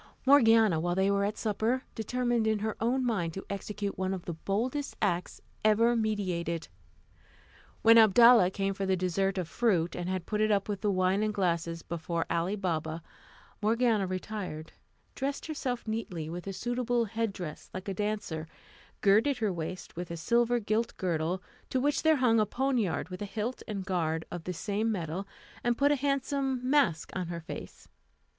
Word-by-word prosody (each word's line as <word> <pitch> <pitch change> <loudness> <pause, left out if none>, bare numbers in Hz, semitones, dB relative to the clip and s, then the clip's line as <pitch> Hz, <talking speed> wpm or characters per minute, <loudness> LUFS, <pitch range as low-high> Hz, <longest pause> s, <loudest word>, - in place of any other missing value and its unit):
Morgiana, 225 - +6
while 175 +2 0
they 190 +1 +2
were 200 0 +2
at 210 +1 -2
supper, 225 +4 0
determined 240 0 0
in 220 -1 +2
her 215 +1 -2
own 250 +3 +1
mind 175 -9 -1
to 195 - -6
execute 200 0 -4
one 190 0 0
of 185 - -9
the 170 - -3
boldest 235 - -2
acts 180 -4 -1 0.2
ever 225 +3 +4
meditated. 185 -7 -1 1.1
When 230 0 +8
Abdalla 225 -1 +7
came 195 +1 -1
for 195 0 -3
the 190 -1 +2
dessert 195 +2 0
of 180 -3 -2
fruit, 175 -6 +1
and 175 0 -3
had 185 -2 -2
put 210 0 -1
it 210 -2 +2
with 205 -2 -3
the 210 - +1
wine 185 +1 +2
and 215 0 +1
glasses 170 -4 -1
before 170 0 -3
Ali 170 +4 0
Baba, 165 -4 -2 0.6
Morgiana 220 -2 +2
retired, 185 -4 -5 0.4
dressed 275 +1 -3
herself 255 -7 -3
neatly, 190 -8 -3
with 175 +2 -6
a 195 - -3
suitable 240 +2 0
head 225 +1 -2
dress 175 -6 -7
like 185 +1 -7
a 195 - -1
dancer, 205 -6 -3 0.5
girded 220 +7 +4
her 215 -4 0
waist 170 +2 -6
with 175 +1 -5
a 170 - -5
silver 240 +6 +2
gilt 220 +2 -1
girdle, 175 0 -1 0.3
to 260 - 0
which 290 +3 +1
there 315 0 +5
hung 245 -5 +3
a 215 - +2
poniard 245 -8 0
with 180 +1 -7
a - - -2
hilt 220 +5 -4
and 200 -4 -4
guard 165 -4 -1
of 175 -2 -6
the 180 - -3
same 210 +5 -1
metal, 180 0 -3 0.4
and 240 -1 +1
put 285 +1 +4
a - - +4
handsome 275 -1 0
mask 255 - +2
on 185 -2 -2
her 170 0 -5
face. 160 - -9
205 Hz, 180 wpm, -30 LUFS, 180-230 Hz, 1.1 s, When